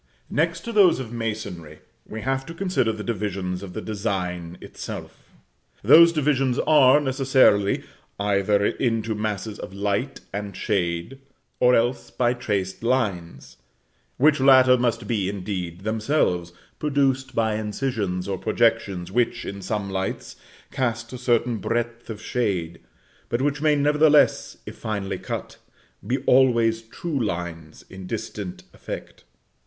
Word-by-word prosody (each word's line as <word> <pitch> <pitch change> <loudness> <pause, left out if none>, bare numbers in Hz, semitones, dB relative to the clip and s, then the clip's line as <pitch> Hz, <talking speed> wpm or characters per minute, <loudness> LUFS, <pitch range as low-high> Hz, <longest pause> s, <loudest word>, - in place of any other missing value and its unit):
Next 165 +2 0
to 235 - -6
those 200 -8 +5
of 120 -4 -6
the - - -7
masonry, 100 -9 -5 0.3
we 110 - -6
have 135 +2 -1
to 165 - -8
consider 180 -11 0
the 110 -1 -6
divisions 95 -5 -3
of 95 -3 -8
the - - -4
design 90 -5 -3
itself. - - -9 0.5
Those 170 +1 +8
divisions 135 -5 +1
are, 145 -2 +5
necessarily, 130 -7 +3 0.4
either 100 0 +2
into 115 -2 0
masses 105 0 -3
of 95 - -8
light 100 +6 -2
and 100 -1 -5
shade, 90 +4 -2 0.4
or 125 0 +5
else 120 +1 0
by 120 -1 +1
traced 100 -6 -3
lines; 95 - -2 0.6
which 150 +2 +4
latter 130 -1 +7
must 120 -2 0
be, 105 -5 -1
indeed, 90 -3 -5
themselves 110 - 0 0.3
produced 135 -3 0
by 110 -1 +1
incisions 105 -4 -2
or 95 -2 -3
projections 110 -5 0
which, 120 +2 0
in 100 0 -6
some 105 +1 -3
lights, 95 0 -4 0.4
cast 120 -2 -2
a - - -5
certain 120 -1 +1
breadth 120 +1 -3
of 110 -2 -6
shade, 95 -9 -2 0.5
but 120 - 0
which 145 0 0
may, 155 -1 +4
nevertheless, 150 +1 +3
if - - -8
finely 100 -3 -3
enough - - -16
cut, - - -5 0.5
be - - +1
always 115 -3 +4
true 135 +4 -4
lines, 85 -5 -5
in 95 -1 -10
distant 105 -4 -5
effect. - - -8
110 Hz, 140 wpm, -24 LUFS, 100-130 Hz, 0.6 s, Those